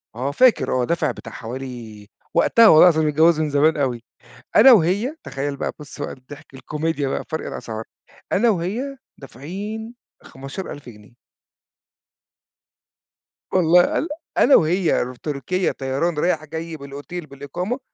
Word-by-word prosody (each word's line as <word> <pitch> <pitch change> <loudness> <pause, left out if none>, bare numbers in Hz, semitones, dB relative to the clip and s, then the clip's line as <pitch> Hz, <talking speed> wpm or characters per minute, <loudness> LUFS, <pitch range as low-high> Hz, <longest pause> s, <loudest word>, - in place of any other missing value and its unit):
آه، 130 +4 -2
فاكر 255 - +3
آه، - - 0
دافع 170 +5 0
بتاع 115 - -10
حوالي 115 -3 -8 0.3
وقتها 230 -1 +5
والله 155 - +8
العظيم 160 -2 +1
متجوز 155 +2 +4
من 155 - 0
زمان 150 +2 +3
أوي، 125 -5 -1 0.5
أنا 260 +5 +9
وهي 210 - +2
تخيّل 140 +1 -4
بقى - - -3
بُصّ 150 0 -11
بقى - - -4
الضحك، 135 +1 -14
الكوميديا 150 +2 -3
بقى، - - -3
فرق 160 - -3
الأسعار، 110 0 -6 0.5
أنا 230 +4 +3
وهي 220 +9 -3 0.2
دافعين 200 - -7 0.3
15.000 135 +1 -8
جنيه. 105 0 -15 2.4
والله 175 -1 +4
الّا 320 - -1 0.3
أنا 280 - +6
وهي 170 +2 +2
رو 125 +1 -7
تركيا 150 +7 -2
طيران 140 +5 -2
رايح 155 -1 0
جاي 160 +1 -6
بالأوتيل 145 +4 -8
بالإقامة، 165 - -5
155 Hz, 135 wpm, -21 LUFS, 135-180 Hz, 2.4 s, أنا